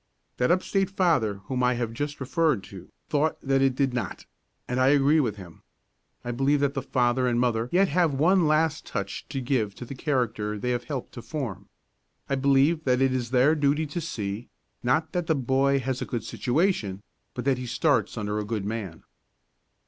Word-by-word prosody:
That 125 - +2
up 185 +2 +3
state 195 -1 0
father 155 - +1
whom 130 -1 -2
I 125 0 +3
have 120 -2 -3
just 145 +4 -4
referred 140 - +1
to 95 -3 -11 0.2
thought 150 +1 0
that 135 0 +1
it 135 -2 +3
did 135 -2 +1
not; 125 - -4 0.4
and 125 +1 -1
I 130 - +4
agree 145 +2 +4
with 120 -8 0
him. 90 -5 -12 0.6
I 120 - -2
believe 135 +4 +2
that 140 -1 +1
the 135 - -2
father 125 -1 +1
and 120 -1 +1
mother 120 -1 +1
yet 195 +2 +4
have 175 -2 +3
that - - -3
one 175 +3 +4
last 155 0 +2
touch 100 0 -4
to 140 -1 -3
give 120 -6 -1
to 125 - -8
the 130 - -7
character 120 -7 -1
they 125 +4 -2
have 120 0 -2
helped 135 -5 -5
to 120 - -8
form. 120 - -5 0.6
I - - -2
believe 140 +3 +3
it 125 0 +3
is 130 -3 +1
their 130 +4 +4
duty 150 +1 +1
to 155 +4 -4
see, 105 -7 -4 0.3
not 140 +6 +1
that 175 -2 -2
the 160 - +3
boy 135 +1 +2
has 130 0 -2
a - - -1
good 120 -3 -4
situation, 120 - 0 0.3
but 125 - -4
that 135 -2 +2
he 125 - -5
starts 125 -4 +1
under 105 0 -2
a - - -2
good 105 -1 -3
man. 100 -6 -5
130 Hz, 200 wpm, -26 LUFS, 120-145 Hz, 0.6 s, I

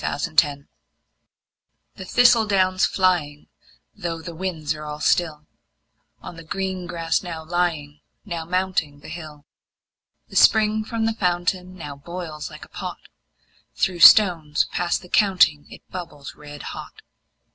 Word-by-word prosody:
Autumn 145 -1 0 1.3
The 190 - -9
thistle 240 +1 +4
down's 185 -2 +2
flying, 170 -6 0 0.4
though 170 -5 -5
the 170 +1 -8
winds 165 -3 -3
are 150 0 -9
all 150 0 -6
still, 155 -2 0 0.8
On 170 - -9
the 165 - -10
green 190 +1 -4
grass 165 -1 -1
now 165 -3 -7
lying, 160 -4 -2 0.2
now 170 -5 -4
mounting 175 -4 -2
the - - -11
hill, 155 -3 -9 0.8
The - - -14
spring 215 0 +4
from 225 0 -2
the 225 - +1
fountain 180 -1 -1
now 145 -5 -8
boils 160 +1 -7
like - - -11
a - - -24
pot; - - -6 0.8
Through 180 -2 -1
stones 165 -6 +6
past 175 +1 -1
the - - -12
counting 180 -7 +3
it - - -14
bubbles 165 -6 -8
red 145 -1 -11
hot. - - -9
175 Hz, 135 wpm, -22 LUFS, 150-185 Hz, 1.3 s, stones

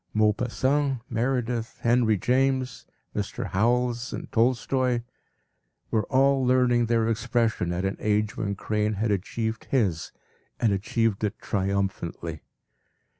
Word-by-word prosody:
Maupassant, 125 +6 +1
Meredith, 120 -1 -1
Henry 115 -2 +3
James, 130 +3 0 0.3
Mr. - - -3
Howells 120 +4 +1
and - - -6
Tolstoy, 125 +1 +1 0.9
were 110 -2 +1
all 135 0 +3
learning 125 -2 +3
their 115 -1 +2
expression 115 -5 0
at 90 +2 -1
an 95 - -2
age 105 0 0
where 105 -3 -2
Crane 105 +1 -1
had 105 +2 0
achieved 110 +3 -2
his 100 - 0 0.5
and 110 -4 +3
achieved 105 +2 0
it 105 +1 -1
triumphantly. 95 -5 -2
115 Hz, 115 wpm, -26 LUFS, 105-125 Hz, 0.9 s, Henry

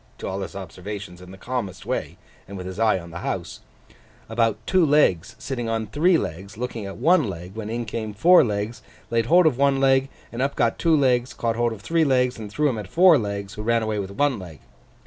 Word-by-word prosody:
to - - -6
all 95 +1 -3
his 95 - -7
observations 95 0 -8
in 90 - -12
the 95 - -11
calmest 100 -5 -5
way, - - -3 0.3
and 100 +1 -8
with 90 - -7
his 95 +2 -7
eye 110 -3 +3
on 85 -2 -9
the 85 - -7
house) - - -4 0.7
about 115 -1 +1
two 185 -1 +3
legs 145 - +2
sitting 120 -4 -4
on 115 -1 -1
three 165 - +3
legs 95 - -6
looking 115 -4 -4
at 95 - -8
one 160 - +4
leg, 90 0 -7
when 110 0 -6
in 120 +1 -3
came 110 0 -4
four 170 - +6
legs, 105 0 -3 0.2
and - - -32
laid 115 -1 +1
hold 175 +4 +5
of 135 -5 +2
one 140 -1 +3
leg, 135 0 +3 0.2
and 120 - -4
up 140 +1 0
got 115 -1 +1
two 165 -2 +3
legs, 125 -3 +1
caught 115 -1 -1
hold 120 0 +1
of 110 -3 -8
three 165 +5 +1
legs, 125 -4 +1
and 105 -2 -7
threw 150 +7 +1
'em 120 -6 -1
at 105 - -7
four 175 - +6
legs, 100 -2 -4
who 105 - -7
ran 115 +1 +1
away 110 -1 -2
with 95 -1 -4
one 130 +4 0
leg. 85 -6 -10
115 Hz, 235 wpm, -23 LUFS, 100-135 Hz, 0.7 s, four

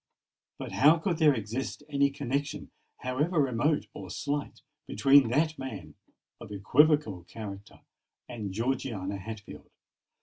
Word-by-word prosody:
But - - -6
how 155 +4 +5
could 170 0 -2
there 150 -3 +5
exist 115 +6 -4
any 140 -1 +2
connexion, 140 +1 -3 0.3
however 150 +7 0
remote 140 +3 +1
or - - -8
slight, 145 0 -4 0.2
between 135 +3 +5
that 155 +5 +1
man 125 -8 -7 0.5
of 115 -3 -10
equivocal 115 - +3
character 100 -1 -9 0.5
and 110 -5 -5
Georgiana 110 -3 -2
Hatfield? 110 +1 -9
130 Hz, 115 wpm, -29 LUFS, 110-145 Hz, 0.5 s, how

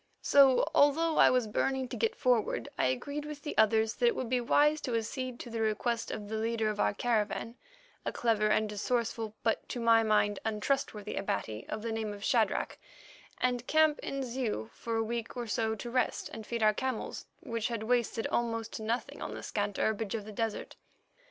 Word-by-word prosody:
So, 275 -2 +6
although 310 +3 +4
I - - +8
was 250 -2 +2
burning 260 +5 0
to - - -5
get 455 +1 0
forward, 235 - +1
I - - +1
agreed 285 - -2
with 300 -1 -8
the 295 - -4
others 220 0 +3
that 485 - +2
it 470 - +3
would 250 - -3
be 250 0 +1
wise 295 +5 +3
to 245 -4 -2
accede 245 +2 -3
to 240 - -8
the 225 -1 -2
request 225 +2 0
of 205 - -5
the 220 +1 -3
leader 220 -1 0
of 210 - -7
our - - +2
caravan, 230 0 0 0.5
a - - -2
clever 220 -3 +1
and 215 0 +2
resourceful, 225 0 -2
but 225 - 0
to 245 - -4
my 230 -1 +5
mind 210 -2 +2
untrustworthy 215 -1 -1
Abati 195 - -3
of 215 0 -4
the 230 - -2
name 220 -2 -2
of 200 - -11
Shadrach, - - +1 0.6
and 245 -1 0
camp 310 -1 +4
in 275 0 -3
Zeu 235 - -3
for 230 -1 -4
a 225 - +1
week 230 +1 -4
or 240 - -2
so 220 0 0
to 240 +2 -7
rest 255 +1 0
and 220 -1 -8
feed 235 -2 -2
our 215 0 +5
camels, 260 +1 -3
which 230 -1 -2
had 230 -3 -3
wasted 235 -1 0
almost 230 -1 -1
to - - -5
nothing 230 +3 -3
on - - -4
the - - -7
scant 205 -1 -2
herbage 220 -1 0
of 215 -2 -4
the 215 - -8
desert. 225 0 -3
230 Hz, 205 wpm, -31 LUFS, 215-250 Hz, 0.6 s, I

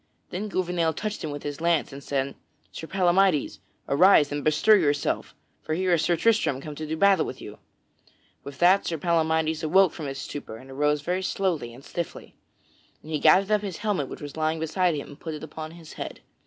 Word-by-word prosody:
Then 200 +4 -3
Gouvernail 175 -4 0
touched 210 +6 -4
him 155 - -3
with 145 0 -6
his 145 +1 -5
lance, 170 -4 +1
and 140 0 -9
said: 135 0 -2 0.4
"Sir 160 - -8
Palamydes, 185 -3 +2 0.3
arise 150 -1 +5
and 145 0 -3
bestir 155 +8 +5
yourself, 145 -7 0 0.3
for 155 - -2
here 185 +1 +1
is 165 - +3
Sir 175 - +2
Tristram 210 - +2
come 150 +2 -7
to 155 +1 -6
do 160 +1 -3
battle 195 -2 +4
with - - -6
you." - - -10 0.8
With 140 -1 -9
that, 185 +5 +4
Sir 165 - -1
Palamydes 160 -1 +1
awoke 185 +3 +4
from 155 -4 -6
his 135 0 -5
stupor 135 -7 -7
and 130 +3 -13
arose 150 +2 +1
very 180 +4 -1
slowly 180 -10 -1
and 130 +4 -14
stiffly. 170 -1 -6 0.7
And 155 - -10
he 155 - 0
gathered 190 +7 +5
up 210 -1 +3
his 195 -4 -5
helmet 185 -11 0
which - - -9
was 145 -1 -7
lying 160 0 0
beside 170 +2 +1
him 145 - -5
and 145 - -13
put 160 -2 -5
it 150 - -9
upon 155 0 -7
his 165 -1 -12
head. - - -7
160 Hz, 210 wpm, -26 LUFS, 145-185 Hz, 0.8 s, arise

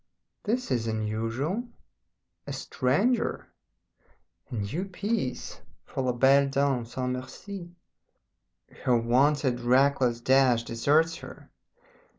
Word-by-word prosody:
This 245 +4 -1
is 120 -3 0
unusual! 115 - -2 0.8
A - - -4
stranger? 195 - 0 1.0
A 125 - -5
new 110 - -2
piece 195 - -3 0.2
for - - -4
La 130 -1 +1
Belle 135 +3 +4
Dame 135 -3 +1
Sans 125 +2 -3
Merci? 175 +8 -7 1.1
Her 125 -2 +3
wonted 130 +2 +2
reckless 125 -1 +3
dash 130 -1 +4
deserts 150 +8 +2
her. - - -12
130 Hz, 100 wpm, -27 LUFS, 120-150 Hz, 1.1 s, Belle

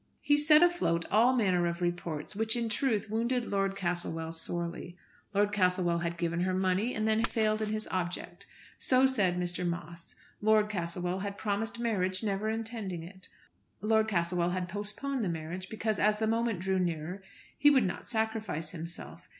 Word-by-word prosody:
He 290 - +4
set 305 +2 +6
afloat 345 - +2
all 235 +5 +5
manner 185 -7 +2
of 170 0 -3
reports, 175 -1 -2
which, 220 +2 +2
in 235 -1 -1
truth, 220 -2 0
wounded 235 +2 0
Lord 195 -1 0
Castlewell 175 -3 -2
sorely. 170 +1 -4 0.3
Lord 205 0 +2
Castlewell 180 -3 +2
had 170 0 -3
given 170 -1 -1
her 185 +1 +1
money, 190 +5 +1
and 215 0 0
had 220 0 +3
then - - +1
failed 220 -2 +1
in 215 - -1
his 215 0 -2
object. 180 -1 -4 0.3
So 255 0 +4
said 205 -9 +2
Mr. 180 0 -2
Moss. 170 -1 -5 0.3
Lord 215 0 +4
Castlewell 175 0 -2
had 200 +1 -4
promised 220 +2 -2
marriage, 190 -5 -1
never 205 0 -1
intending 220 -6 -4
it. 185 +2 -12 0.5
Lord 220 +1 +2
Castlewell 175 -3 +1
had 180 0 -2
postponed 210 +7 -3
the 190 - 0
marriage 170 +3 -5
because 220 -2 -1
as 210 +1 +3
the 220 - 0
moment 225 -3 0
drew 190 0 +1
nearer 175 +1 -2 0.3
he 290 - +6
would 270 -6 +4
not 180 - -4
sacrifice 220 -9 -2
himself. 170 0 -8
195 Hz, 175 wpm, -30 LUFS, 175-220 Hz, 0.5 s, set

